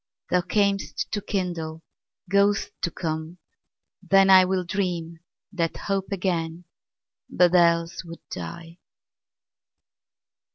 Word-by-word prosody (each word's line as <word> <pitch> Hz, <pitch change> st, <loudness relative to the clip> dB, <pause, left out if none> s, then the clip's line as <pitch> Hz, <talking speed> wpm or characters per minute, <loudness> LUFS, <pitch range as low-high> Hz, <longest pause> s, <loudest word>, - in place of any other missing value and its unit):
Thou 180 Hz, -, +3 dB
cam'st 180 Hz, -6 st, 0 dB
to 205 Hz, -, -2 dB
kindle, 165 Hz, -5 st, -3 dB, 0.4 s
goest 200 Hz, +2 st, +2 dB
to -, -, 0 dB
come: 160 Hz, 0 st, -4 dB, 0.6 s
then 195 Hz, 0 st, +4 dB
IWill 185 Hz, -1 st, +5 dB
dream 170 Hz, -3 st, -3 dB, 0.3 s
that 170 Hz, -5 st, -2 dB
hope 195 Hz, -1 st, -2 dB
again, 175 Hz, -3 st, -2 dB, 0.6 s
but 175 Hz, 0 st, +3 dB
else 170 Hz, -1 st, +3 dB
would 170 Hz, -1 st, -12 dB
die. 170 Hz, 0 st, -8 dB
175 Hz, 95 wpm, -25 LUFS, 165-195 Hz, 0.6 s, IWill